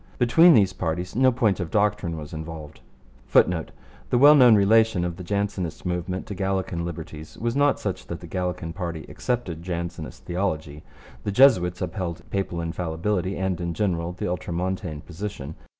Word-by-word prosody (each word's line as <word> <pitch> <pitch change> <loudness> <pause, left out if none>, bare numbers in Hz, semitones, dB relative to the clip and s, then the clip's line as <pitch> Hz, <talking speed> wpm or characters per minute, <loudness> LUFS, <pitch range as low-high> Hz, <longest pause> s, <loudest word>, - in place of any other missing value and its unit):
Between 160 +8 +6
these 100 -4 +4
parties 90 +2 -3
no 130 +1 +5
point 110 -7 +1
of 90 -3 -3
doctrine 105 -5 0
was 75 -1 -8
involved, 80 -1 -8 0.5
[Footnote: 85 -3 +3 0.4
The 125 - +2
well 145 +4 +8
known 125 -6 +7
relation 105 -2 +4
of 85 -1 -3
the 90 - -8
Jansenist 100 -3 -3
movement 90 +1 -3
to 105 - -6
Gallican 95 -3 -2
liberties 80 -2 -8
was 120 +1 -2
not 145 0 +3
such - - -4
that - - -5
the - - -10
Gallican 90 -3 -3
party 85 -3 -5
accepted 115 -10 -3
Jansenist 85 -2 -6
theology. 80 -5 -3 0.4
The 100 - -2
Jesuits 95 -8 +4
upheld 90 -2 -5
papal 95 -3 -2
infallibility 90 +3 -2
and, 95 -2 -2
in 85 -1 -3
general, 85 -5 -1
the 90 - -4
Ultramontane 90 -2 -3
position. 85 -4 -6
90 Hz, 160 wpm, -24 LUFS, 85-105 Hz, 0.5 s, well